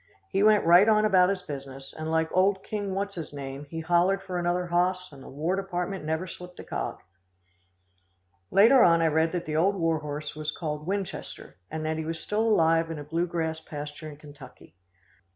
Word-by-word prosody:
He 195 - 0
went 210 -2 +5
right 175 +6 +7
on 215 0 +4
about 185 -3 +5
his 195 -2 -2
business, 135 -2 -8
and, 155 0 -5
like 160 0 0
old 190 +1 +3
King 205 -3 -4
What's 200 +1 -2
His 165 -5 -7
name 140 0 -7
he 165 +1 -5
hollered 175 +4 +2
for 180 -2 -3
another 175 +1 0
hoss, 180 +1 0
and 140 -2 -13
the - - -11
War 160 +7 -1
Department 195 -1 -3
never 160 +3 -2
slipped 180 0 -10
a - - -7
cog." - - -4 1.5
Later 225 +7 +6
on 170 -5 +5
I - - +4
read 160 +1 +2
that 175 -1 -2
the 155 - -3
old 195 +5 +3
war 165 -3 +1
horse 150 0 -6
was 155 0 -4
called 150 -1 -4
Winchester 195 - -5
and 155 0 -4
that 160 0 -1
he - - -2
was 165 0 -4
still 210 +1 -1
alive 165 -7 +3
in 165 - -5
a 145 - -6
blue 165 +4 -1
grass 160 -2 -2
pasture 150 0 -8
in 145 - -11
Kentucky. 145 -3 -14
165 Hz, 205 wpm, -27 LUFS, 155-190 Hz, 1.5 s, right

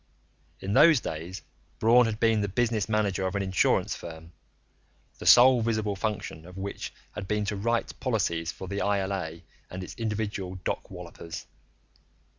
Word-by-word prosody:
In 95 +1 -2
those 155 +3 +7
days, 85 0 -6 0.3
Braun 120 +2 +5
had 110 -1 -3
been 115 -2 +3
the 100 - 0
business 110 0 0
manager 100 -3 +1
of 95 - -4
an 100 - 0
insurance 95 -2 +2
firm, 80 0 -10 0.9
the - - -5
sole 125 0 +8
visible 110 -3 0
function 95 -6 -3
of 90 +1 -12
which 100 +1 -5 0.2
had 100 -2 -6
been 105 0 0
to 105 - -2
write 115 +4 -1
policies 85 -9 0
for 95 - -9
the 100 +1 -3
ILA 95 -5 -1 0.3
and 95 +1 -6
its - - -8
individual 105 -4 -3
dock - - -3
wallopers. 85 0 -8
100 Hz, 155 wpm, -28 LUFS, 95-110 Hz, 0.9 s, sole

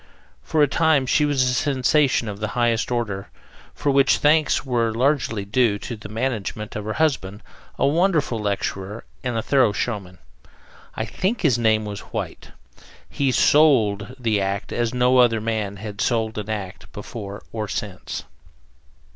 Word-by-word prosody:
For 155 -2 +2
a - - +4
time 155 -1 +2
she 150 +3 +3
was 145 -3 +2
a 125 0 +1
sensation 135 -1 +2
of 100 -1 -5
the 110 - -2
highest 120 -2 +1
order, 105 -5 -2 0.5
for 145 - 0
which 140 0 +4
thanks 150 0 +3
were 120 -3 +1
largely 120 -4 0
due 105 0 +2
to 120 +3 -6
the 105 -1 -10
management 110 -2 -3
of 105 -1 -4
her 110 - -2
husband, 110 -10 -1 0.3
a - - +2
wonderful 155 - +2
lecturer 100 0 -3 0.2
and 125 -2 -2
a 110 - -1
thorough 130 -7 +3
showman. 100 -6 -3 0.8
I - - -2
think 205 +6 -2
his 130 -8 +3
name 110 -2 +2
was 105 -1 -5
White. - - -6 0.6
He 140 -2 0
"sold" 125 -7 +3
the 110 -5 0
act 100 0 -3
as 120 -1 0
no 125 +1 +3
other 115 -2 +4
man 110 -2 -2
has 105 +1 -7
sold 110 -1 0
an 105 +1 -6
act 100 -4 -6
before 100 -3 -7
or 110 -2 -3
since. 100 -3 -5
115 Hz, 160 wpm, -22 LUFS, 105-135 Hz, 0.8 s, a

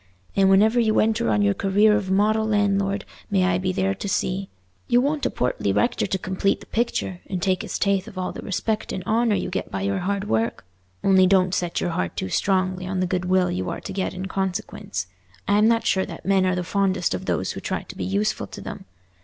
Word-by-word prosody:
And 195 -1 +4
whenever 215 +5 +5
you 220 -2 +3
enter 215 - +2
on 105 -1 +2
your 100 0 +3
career 205 - +3
of 205 -2 -1
model 215 +3 +2
landlord 200 -1 +1 0.2
may 195 -2 +2
I 180 -1 +2
be 185 0 0
there 190 +1 0
to 195 +1 -5
see. 190 0 -1 0.4
You'll 245 +1 +4
want 295 +1 0
a - - -2
portly - - -1
rector 240 -3 +1
to 190 - -1
complete 190 +2 0
the - - -13
picture, 220 -6 -2
and 185 - -3
take 185 0 +1
his - - -4
tithe 200 -2 +1
of 190 - -11
all 185 -1 -2
the - - -8
respect 215 +2 -2
and 185 - -4
honour 225 +2 +2
you 185 - -2
get - - -3
by 195 - -3
your 200 -1 0
hard 200 +2 -2
work. 110 -3 -1 0.4
Only 190 -1 +5
don't 185 -1 +3
set 175 -2 -1
your 175 - -1
heart 90 - -2
too 95 - -2
strongly 185 - 0
on 185 0 -2
the 185 - +2
goodwill 180 0 +1
you 90 0 -2
are - - -5
to - - -6
get 190 -1 -2
in 185 +1 -4
consequence. 185 - -3 0.4
I'm 210 +2 +4
not 230 -1 +2
sure 190 -1 +1
that - - -9
men 190 -1 +3
are 185 - +1
the 180 - -2
fondest 190 - 0
of 95 - -4
those - - -1
who - - -6
try - - -3
to - - -11
be 95 - -4
useful 100 +3 -1
to - - -9
them. - - -8
190 Hz, 230 wpm, -23 LUFS, 185-205 Hz, 0.4 s, whenever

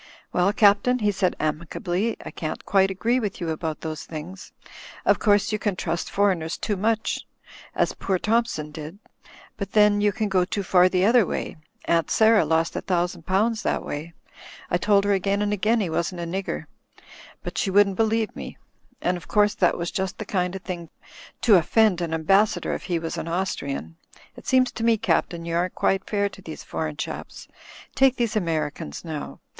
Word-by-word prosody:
'Well, 180 +2 +3
Captain," 205 +4 +4
he 210 -4 +1
said, 185 -2 0
amicably. 175 +7 -2
"I - - -6
can't 155 -1 -5
quite 195 -1 +3
agree 230 +6 +1
with 210 -5 -3
you 170 - -3
about 160 -1 -4
those 155 -1 -5
things. 165 +4 -8 0.5
Of - - +4
course, 205 -1 +3
you 215 - -1
can 200 -1 -1
trust 170 -1 -3
foreigners 185 -5 +1
too 210 - -2
much 220 +3 -1 0.5
as - - +1
poor 190 -1 -1
Thompson 215 -8 0
did; 155 +4 -8 0.6
but 200 -1 -5
then 210 -1 +5
you 205 0 +3
can 215 0 -2
go 190 -2 +2
too 200 +2 -3
far 180 0 +5
the 185 0 +2
other 235 +2 +5
way. - - -4 0.3
Aunt 165 -2 +1
Sarah 220 -1 +5
lost 160 +1 +1
a - - -2
thousand 175 -2 -1
pounds 215 +4 +1
that - - -1
way. 155 +3 -5 0.6
I 175 - +3
told 200 +1 +3
her 205 0 +2
again 195 +1 +1
and 210 0 0
again 215 +3 +2
he 185 - -1
wasn't 170 +2 -2
a - - -3
nigger, 185 +3 -3 0.8
but - - -4
she 205 - 0
wouldn't 200 0 +4
i82 - - -12
THE - - +6
FLYING 225 +1 +2
INN 220 - -1
believe - - -28
me. - - -8 0.5
And, 180 +1 +1
of 175 - -12
course, 210 -1 +3
that 190 -4 +2
was 170 0 -3
just 190 -1 -3
the 215 - -5
kind 180 -2 -1
of 190 - -7
thing 170 -3 -6 0.5
to 215 -5 +6
offend 185 +2 +3
an 170 -2 -2
ambassador 195 +6 +2
if - - -5
he 175 -2 0
was 165 0 -4
an - - -5
Austrian. 140 - -3 0.4
It - - -13
seems 255 -1 +3
to 225 - -5
me. 230 -1 +4
Captain, 170 -4 0
you 170 0 -2
aren't 175 +1 0
quite 195 0 0
fair 205 -1 +1
to 195 - -11
these 160 -4 -8
foreign 155 -2 -4
chaps. - - -6 0.5
Take 270 -1 +4
these 235 -4 -1
Americans, 155 - -2
now! 155 -3 -6
190 Hz, 200 wpm, -24 LUFS, 170-210 Hz, 0.8 s, THE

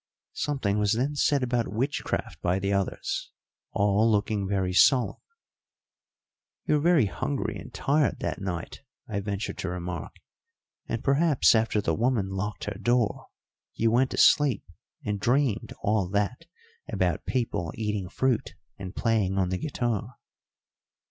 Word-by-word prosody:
Something 110 -9 -1
was 105 0 +2
then 130 +6 0
said 145 -1 +2
about 120 -2 0
witchcraft 130 +7 -2
by 90 +1 +1
the 100 +1 -1
others, 390 - -2 0.4
all 105 +2 +3
looking 105 -1 0
very 95 -2 0
solemn. 125 +6 +4 1.4
"You - - +2
were 150 - +4
very 170 -6 +4
hungry 135 +7 -2
and 130 - -10
tired 145 +4 +1
that - - -3
night," 90 -3 -5 0.3
I 105 -2 -2
ventured 100 0 -4
to 95 - -2
remark, 90 -2 -5 0.7
"and 115 - -3
perhaps 145 +1 +4
after 110 -2 +2
the - - 0
woman 115 -4 +1
locked 95 +2 -4
her - - -5
door 120 -3 +1 0.5
you 115 0 +2
went 130 +3 +3
to - - -5
sleep 145 -6 +5 0.4
and 105 -1 -1
dreamed 120 -1 +1
all 100 -3 +1
that 105 - -1 0.4
about - - 0
people 115 -10 -1
eating 105 -4 -2
fruit 130 +3 0 0.2
and 95 0 -7
playing 105 -5 +1
on 95 -2 +1
the 90 0 -2
guitar." 120 -5 -2
110 Hz, 140 wpm, -27 LUFS, 100-130 Hz, 1.4 s, sleep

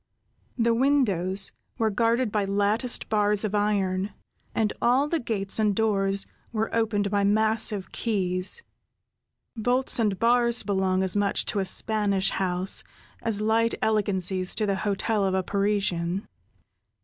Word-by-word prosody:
The 230 -1 +2
windows 205 -8 +1 0.3
were 220 -1 +1
guarded 230 +2 +1
by 210 -1 0
latticed 205 +5 0
bars 210 -1 +1
of 215 -2 -2
iron, 200 -2 0 0.4
and 215 -2 0
all 255 +4 +3
the 330 +2 -1
gates 210 -4 -3
and 210 -2 +2
doors 195 -2 +1 0.3
were 220 -1 -2
opened 210 -3 0
by 200 -1 +1
massive 215 -1 +1
keys. 190 - 0 0.9
Bolts 245 +3 +1
and 210 -4 +1
bars 235 +1 +2
belong 190 -2 0
as 190 0 0
much 205 -1 +1
to 205 - 0
a 195 - -1
Spanish 200 -1 +2
house, 185 0 0 0.4
as 215 -2 +1
light 225 +2 +1
elegancies 190 -3 +1
to 215 - +1
the 200 -1 -1
hotel 205 +1 -1
of 190 -1 0
a 190 - 0
Parisian. 195 -2 -1
205 Hz, 135 wpm, -25 LUFS, 195-225 Hz, 0.9 s, all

